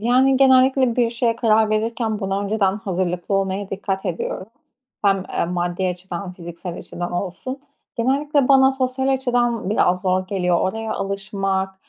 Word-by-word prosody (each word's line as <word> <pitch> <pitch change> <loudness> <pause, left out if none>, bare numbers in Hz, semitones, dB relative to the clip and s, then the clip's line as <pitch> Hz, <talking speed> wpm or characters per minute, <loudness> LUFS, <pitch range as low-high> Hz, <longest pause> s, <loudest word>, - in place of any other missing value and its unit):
yani, 255 +4 +4
genellikle 260 -2 +4
bir 235 -2 +2
şeye 230 -1 0
karar 220 -2 +3
verirken 220 0 -1
buna 195 +1 -1
önceden 200 -1 +1
hazırlıklı 185 -1 -2
olmaya 195 0 -1
dikkat 195 0 -3
ediyorum. 180 +2 -3 0.6
Hem, 195 -1 +3
eee, - - 0
maddi 175 +1 -1
açıdan, 180 +1 -5
fiziksel 170 0 -8
açıdan 175 0 -6
olsun. 200 +9 -4 0.4
Genellikle 275 +3 +1
bana 265 -1 +6
sosyal 265 0 -1
açıdan 240 -5 0
biraz 180 -3 +2
zor 185 0 0
geliyor. 180 -3 +1
Oraya 220 +3 -2
alışmak, 195 -1 -2
200 Hz, 140 wpm, -21 LUFS, 185-245 Hz, 0.6 s, bana